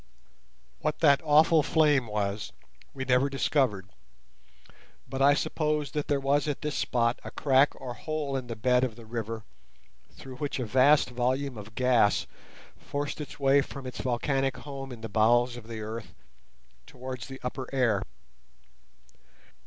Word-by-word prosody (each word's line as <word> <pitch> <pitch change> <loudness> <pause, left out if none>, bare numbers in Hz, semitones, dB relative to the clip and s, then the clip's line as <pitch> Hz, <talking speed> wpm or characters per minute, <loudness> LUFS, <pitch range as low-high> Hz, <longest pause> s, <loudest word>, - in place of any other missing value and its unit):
What 155 0 -1
that 145 -3 +5
awful 155 +1 +5
flame 150 -5 +3
was 105 -1 -3 0.4
we 135 - -5
never 130 +2 +3
discovered, 130 -8 0 1.2
but 135 - -4
I 140 +1 +6
suppose 150 -3 -1
that 150 -1 -3
there 145 -1 +1
was 140 +2 +1
at 145 0 -3
this 150 -1 -2
spot 120 -1 0
a - - -6
crack 140 0 +2
or 125 - -6
hole 150 0 -3
in 130 -2 -3
the 115 - -5
bed 125 +3 +2
of 125 -4 -1
the 115 -1 -12
river 115 -1 -5 0.7
through 130 -1 -11
which 145 +1 -3
a 125 - -2
vast 130 +4 +4
volume 130 +2 -1
of 110 +1 -10
gas 125 -5 +3 0.5
forced 145 +1 -4
its 145 - -9
way 140 0 +4
from 140 -1 -8
its 125 - -5
volcanic 135 +1 0
home 135 0 -7
in 120 -2 -9
the 115 - -4
bowels 120 +3 +3
of 120 -2 -10
the 115 -1 -6
earth 110 +1 -7 0.7
towards 125 -2 -7
the 135 0 -9
upper 125 +1 -4
air. 120 -7 +2
130 Hz, 155 wpm, -28 LUFS, 120-140 Hz, 1.2 s, I